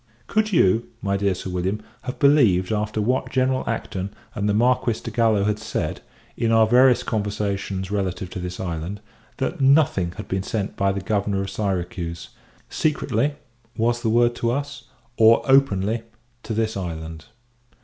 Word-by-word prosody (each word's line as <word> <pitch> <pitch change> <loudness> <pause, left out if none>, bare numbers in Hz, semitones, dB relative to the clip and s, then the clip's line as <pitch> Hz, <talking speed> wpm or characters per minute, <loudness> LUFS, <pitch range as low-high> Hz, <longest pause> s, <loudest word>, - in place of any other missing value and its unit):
Could 215 0 0
you, 115 - +3 0.2
my 100 -1 0
dear 100 -1 +1
Sir 95 - -6
William, 90 +4 -1 0.3
have 125 - -4
believed, 115 -11 +4
after 105 0 -1
what 125 +5 0
General 130 0 +1
Acton 100 -4 -3 0.2
and 105 0 -1
the - - +2
Marquis 120 0 +2
de - - -5
Gallo 110 -4 +2
had 105 +1 0
said, 110 - -3 0.3
in 115 -1 0
our 115 -1 +5
various 125 +2 +5
conversations 100 -3 -2
relative 95 -2 -2
to - - -5
this 90 0 -6
island, 85 +3 -4 0.4
that 145 +4 -2
nothing 135 - +3
had - - -8
been 95 0 -1
sent 100 +1 -3
by 100 0 +1
the 100 0 -3
Governor 100 0 0
of 95 - -6
Syracuse 90 -4 -3 0.4
secretly 145 -2 0 0.4
(was 120 +1 +1
the 115 - 0
word 120 +1 +3
to 115 - 0
us) 140 0 -3 0.3
or 115 +1 +6
openly 115 -5 +3 0.4
to 110 - -4
this 110 0 0
island? 80 -3 -6
105 Hz, 160 wpm, -23 LUFS, 95-120 Hz, 0.4 s, or